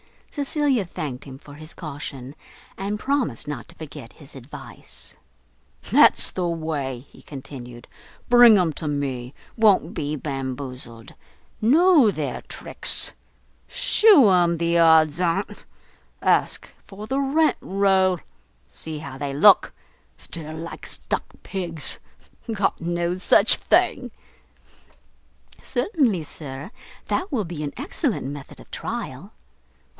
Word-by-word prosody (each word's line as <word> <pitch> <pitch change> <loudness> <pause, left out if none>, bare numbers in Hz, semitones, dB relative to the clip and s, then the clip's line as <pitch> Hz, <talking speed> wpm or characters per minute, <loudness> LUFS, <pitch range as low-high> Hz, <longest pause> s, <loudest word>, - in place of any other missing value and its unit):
Cecilia 285 - 0
thanked 150 -7 -6
him 135 -2 -10
for 145 +1 -14
his 155 +2 -10
caution, 140 -4 -8 0.4
and 200 +2 -3
promised 255 - -1
not 140 -5 -6
to - - -16
forget 135 -6 -10
his 145 -2 -14
advice. 135 +1 -9 0.8
"That's - - +5
the 180 -2 -2
way," 150 -6 -4
he - - -17
continued, 125 -4 -10 0.4
"bring 240 -3 +8
'em 175 -4 +2
to 155 - -5
me. 135 -3 -3 0.2
Won't 215 -3 +3
be 145 +1 -3
bamboozled. 130 -4 -6 0.5
Know 300 - +5
their 155 -6 -4
tricks. - - +2 0.6
Shew 400 - +5
'em 175 -2 +3
the 170 +1 +1
odds 160 -1 +5
on't. 180 +3 -2 0.6
Ask - - +1 0.2
for 205 +1 -10
the 265 +5 -1
rent 300 +3 +2
roll, 190 -2 +2 0.5
see 160 -1 -7
how 135 -4 -9
they 140 -1 -3
look! 190 +8 +5 0.5
stare 155 -2 -7
like 165 +1 -8
stuck - - -3
pigs! 170 -5 -3 0.5
got 210 -3 0
no 170 +1 -1
such 185 - +6
thing." - - +1 1.5
"Certainly, 250 - 0
sir, 145 +4 -7 0.4
that 370 0 -2
will 225 -8 -1
be 165 -3 -6
an 145 - -4
excellent 280 - -2
method 140 0 -8
of - - -16
trial." - - -6
165 Hz, 120 wpm, -23 LUFS, 140-205 Hz, 1.5 s, bring